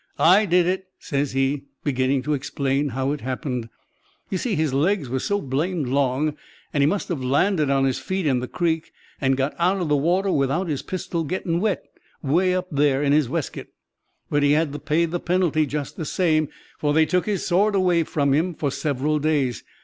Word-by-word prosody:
'I 195 Hz, +5 st, +5 dB
did 180 Hz, 0 st, +4 dB
it,' 185 Hz, +1 st, -1 dB
says 140 Hz, -1 st, -2 dB
he, 135 Hz, +1 st, 0 dB, 0.2 s
beginning 130 Hz, -1 st, +1 dB
to 150 Hz, -, 0 dB
explain 140 Hz, 0 st, -1 dB
how 135 Hz, +2 st, -1 dB
it 150 Hz, -, -3 dB
happened. 125 Hz, -2 st, -3 dB, 0.6 s
"You 190 Hz, -, 0 dB
see, 230 Hz, -6 st, -1 dB
his 155 Hz, -4 st, 0 dB
legs 150 Hz, 0 st, +1 dB
was 130 Hz, +1 st, -2 dB
so 205 Hz, 0 st, 0 dB
blamed 150 Hz, 0 st, -2 dB
long, 140 Hz, +2 st, +1 dB, 0.4 s
and 145 Hz, -, +2 dB
he 140 Hz, -, +5 dB
must 200 Hz, +5 st, -1 dB
have 155 Hz, -7 st, -2 dB
landed 150 Hz, +4 st, +2 dB
on 135 Hz, -1 st, +3 dB
his 130 Hz, -2 st, 0 dB
feet, 190 Hz, -2 st, -3 dB
in 130 Hz, -4 st, +2 dB
the 125 Hz, -, -4 dB
creek, 165 Hz, 0 st, -1 dB, 0.3 s
and 135 Hz, -1 st, +2 dB
got 135 Hz, +2 st, 0 dB
out 180 Hz, +3 st, +2 dB
of 175 Hz, -4 st, -2 dB
the 150 Hz, -, +4 dB
water 180 Hz, +7 st, +1 dB
without 145 Hz, +6 st, +1 dB
his 145 Hz, -4 st, -2 dB
pistol 185 Hz, -2 st, -3 dB
getting 170 Hz, +1 st, -1 dB
wet, 210 Hz, 0 st, -1 dB, 0.4 s
'way 180 Hz, +6 st, +2 dB
up 185 Hz, 0 st, -1 dB
there 145 Hz, -1 st, +2 dB
in 140 Hz, 0 st, +3 dB
his 150 Hz, -5 st, +3 dB
weskit! 160 Hz, -1 st, -4 dB, 0.5 s
"But 145 Hz, -, +1 dB
he 145 Hz, 0 st, +4 dB
had 155 Hz, -1 st, +1 dB
to 150 Hz, -, -5 dB
pay 160 Hz, +2 st, +1 dB
the 170 Hz, +1 st, -3 dB
penalty 170 Hz, -4 st, +1 dB
just 145 Hz, 0 st, -4 dB
the 160 Hz, -, -4 dB
same, 155 Hz, -2 st, +1 dB, 0.3 s
for 145 Hz, 0 st, +1 dB
they 160 Hz, 0 st, +5 dB
took 180 Hz, +4 st, 0 dB
his 205 Hz, -3 st, -1 dB
sword 200 Hz, +4 st, +2 dB
away 180 Hz, -3 st, +3 dB
from 145 Hz, -3 st, 0 dB
him 165 Hz, +4 st, +1 dB
for 145 Hz, -2 st, -1 dB
several 145 Hz, +2 st, -1 dB
days. 140 Hz, -, 0 dB
150 Hz, 205 wpm, -23 LUFS, 140-175 Hz, 0.6 s, I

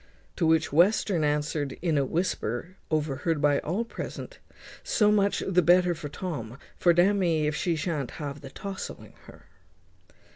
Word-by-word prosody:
To 170 Hz, -, +2 dB
which 160 Hz, -2 st, +2 dB
Western 180 Hz, 0 st, +3 dB
answered, 150 Hz, -1 st, -1 dB
in 165 Hz, -3 st, 0 dB
a 140 Hz, -, +3 dB
whisper, 165 Hz, -, -2 dB
overheard 155 Hz, +1 st, 0 dB
by 145 Hz, -1 st, +3 dB
all 195 Hz, +9 st, -2 dB
present, -, -, -7 dB, 0.4 s
"So 210 Hz, -1 st, +3 dB
much 200 Hz, -1 st, +2 dB
the 180 Hz, -2 st, +3 dB
better 180 Hz, +1 st, +4 dB
for 155 Hz, -3 st, -7 dB
Tom; 140 Hz, -8 st, -5 dB, 0.2 s
for 175 Hz, -, +4 dB
d 175 Hz, +1 st, +5 dB
n 200 Hz, +2 st, +2 dB
me 165 Hz, -4 st, +1 dB
if 150 Hz, 0 st, 0 dB
he 170 Hz, -2 st, +2 dB
shan't 155 Hz, -4 st, -2 dB
ha 145 Hz, -3 st, -4 dB
the 140 Hz, -1 st, -11 dB
tousling 195 Hz, +7 st, -7 dB
her." -, -, -15 dB
165 Hz, 160 wpm, -27 LUFS, 145-185 Hz, 0.4 s, d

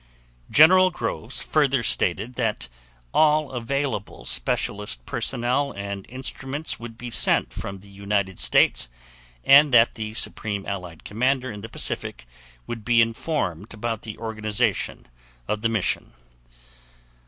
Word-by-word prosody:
General 185 Hz, +5 st, +7 dB
Groves 175 Hz, -, -3 dB
further 140 Hz, -5 st, +2 dB
stated 105 Hz, +3 st, +2 dB
that 110 Hz, -, -2 dB, 0.4 s
all 155 Hz, -2 st, +3 dB
available 130 Hz, -2 st, -3 dB
specialist -, -, -2 dB
personnel 125 Hz, +4 st, -1 dB
and 100 Hz, -1 st, -6 dB
instruments 135 Hz, +4 st, -3 dB
would 115 Hz, -1 st, -9 dB
be 120 Hz, 0 st, -7 dB
sent -, -, +3 dB
from 100 Hz, -, -6 dB
the 100 Hz, -, -15 dB
United 100 Hz, -1 st, -2 dB
States, 60 Hz, -, +3 dB, 0.5 s
and 140 Hz, +1 st, +7 dB
that 120 Hz, -1 st, +5 dB
the 110 Hz, -1 st, -6 dB
Supreme 105 Hz, -4 st, -2 dB
Allied 90 Hz, -4 st, -6 dB
Commander 130 Hz, +4 st, 0 dB
in 105 Hz, -1 st, -8 dB
the 115 Hz, -, -8 dB
Pacific 60 Hz, -, -2 dB, 0.4 s
would 115 Hz, -2 st, -6 dB
be 120 Hz, +1 st, +3 dB
informed 115 Hz, -, -1 dB
about 115 Hz, 0 st, -3 dB
the 110 Hz, -2 st, -8 dB
organization 110 Hz, -2 st, -1 dB, 0.4 s
of 105 Hz, -, -2 dB
the 115 Hz, -, +1 dB
mission. 110 Hz, -4 st, -1 dB
115 Hz, 125 wpm, -24 LUFS, 100-130 Hz, 0.5 s, General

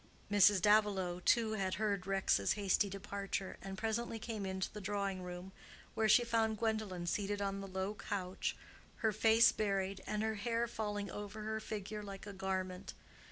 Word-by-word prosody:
Mrs. 205 Hz, -2 st, +6 dB
Davilow, 205 Hz, -4 st, +3 dB
too, 230 Hz, -2 st, +4 dB
had 195 Hz, -3 st, -1 dB
heard 200 Hz, -1 st, -1 dB
Rex's 195 Hz, -, +2 dB
hasty 200 Hz, 0 st, +2 dB
departure, 195 Hz, 0 st, -4 dB
and 195 Hz, 0 st, -6 dB
presently 225 Hz, +2 st, -1 dB
came 220 Hz, -3 st, -4 dB
into 190 Hz, 0 st, -3 dB
the 210 Hz, -, -6 dB
drawing 200 Hz, -1 st, -2 dB
room, 180 Hz, +1 st, -7 dB, 0.4 s
where 220 Hz, -1 st, +2 dB
she 240 Hz, -, +7 dB
found 225 Hz, -2 st, +1 dB
Gwendolen 215 Hz, -6 st, -1 dB
seated 205 Hz, +3 st, -1 dB
on 195 Hz, -1 st, -2 dB
the 195 Hz, -, -6 dB
low 190 Hz, +2 st, -2 dB
couch, 190 Hz, -3 st, -3 dB, 0.5 s
her 220 Hz, -, +5 dB
face 225 Hz, +2 st, +6 dB
buried, 195 Hz, -2 st, -1 dB
and 210 Hz, 0 st, -1 dB
her 220 Hz, 0 st, 0 dB
hair 230 Hz, +1 st, +1 dB
falling 210 Hz, -3 st, -3 dB
over 205 Hz, +1 st, -6 dB
her 220 Hz, 0 st, -2 dB
figure 210 Hz, -1 st, -5 dB
like 200 Hz, -1 st, -8 dB
a 205 Hz, -, -7 dB
garment. 190 Hz, -1 st, -3 dB
205 Hz, 165 wpm, -36 LUFS, 190-215 Hz, 0.5 s, she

